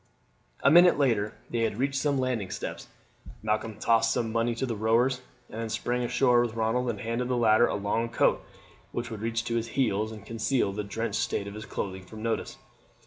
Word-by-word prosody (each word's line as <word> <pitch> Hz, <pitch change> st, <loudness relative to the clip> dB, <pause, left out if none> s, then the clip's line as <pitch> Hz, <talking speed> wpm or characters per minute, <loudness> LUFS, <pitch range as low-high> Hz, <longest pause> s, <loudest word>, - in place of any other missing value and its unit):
A 140 Hz, -, +6 dB
minute 175 Hz, +2 st, +7 dB
later 115 Hz, -7 st, +1 dB, 0.2 s
they 120 Hz, -, -1 dB
had 115 Hz, -2 st, 0 dB
reached 135 Hz, +1 st, 0 dB
some 145 Hz, -2 st, +1 dB
landing 125 Hz, -7 st, -1 dB
steps. -, -, -6 dB, 0.6 s
Malcolm 110 Hz, 0 st, -1 dB
tossed 115 Hz, 0 st, +3 dB
some 115 Hz, -1 st, -1 dB
money 115 Hz, +1 st, 0 dB
to 125 Hz, -, -1 dB
the 120 Hz, -3 st, -3 dB
rowers, 120 Hz, +4 st, +2 dB, 0.3 s
and 110 Hz, -, -6 dB
then 115 Hz, -, -3 dB
sprang 120 Hz, +3 st, -1 dB
ashore 120 Hz, 0 st, +3 dB
with 120 Hz, -2 st, -2 dB
Ronald, 115 Hz, +3 st, 0 dB
and 105 Hz, -4 st, -3 dB
handed 115 Hz, +2 st, -2 dB
the 125 Hz, -1 st, 0 dB
latter 115 Hz, 0 st, +5 dB
a -, -, -2 dB
long 105 Hz, +3 st, -1 dB
coat 120 Hz, -, +2 dB, 0.5 s
which 120 Hz, 0 st, -4 dB
would 110 Hz, -2 st, -6 dB
reach 115 Hz, +1 st, -1 dB
to 115 Hz, 0 st, -1 dB
his 115 Hz, 0 st, -2 dB
heels 110 Hz, -4 st, +1 dB
and 105 Hz, -2 st, -10 dB
conceal 115 Hz, -1 st, 0 dB
the 105 Hz, +1 st, -3 dB
drenched 100 Hz, -, -2 dB
state 100 Hz, -, -1 dB
of 100 Hz, -, -7 dB
his 110 Hz, +1 st, -8 dB
clothing 95 Hz, -1 st, -4 dB
from 110 Hz, +4 st, -10 dB
notice. 115 Hz, -1 st, -2 dB
115 Hz, 205 wpm, -28 LUFS, 110-120 Hz, 0.6 s, minute